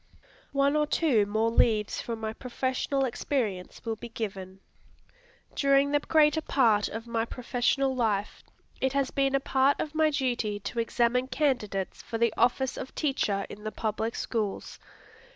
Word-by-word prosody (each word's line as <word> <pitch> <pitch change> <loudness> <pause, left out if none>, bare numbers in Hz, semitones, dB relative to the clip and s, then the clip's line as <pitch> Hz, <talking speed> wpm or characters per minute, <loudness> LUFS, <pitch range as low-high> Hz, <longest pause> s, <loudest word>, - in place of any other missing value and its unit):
One 280 +1 +3
or 300 0 +2
two 250 -11 +2
more 220 +2 +1
leaves 215 -2 +2
from 230 -1 -5
my 220 0 -3
professional 260 +2 -1
experience 235 -7 -3
will 225 -1 -2
be 235 - -8
given. 195 -4 -6 0.9
During 275 0 +3
the 290 - +3
greater 310 +1 +3
part 230 -9 +3
of 225 +1 -6
my 230 -1 -1
professional 250 +3 0
life, 215 -4 -1 0.4
it 265 0 0
has 275 -1 0
been 275 0 +1
a - - +3
part 270 +1 +2
of 305 - -3
my 315 0 +3
duty 245 -7 -1
to 235 - -4
examine 240 +2 +1
candidates 245 -9 -1
for 225 - -5
the 230 -1 +2
office 250 +2 +1
of 260 - -7
teacher 215 -9 0
in 210 - -10
the 215 - -3
public 220 +1 -2
schools. 215 -4 -3
240 Hz, 155 wpm, -28 LUFS, 220-275 Hz, 0.9 s, One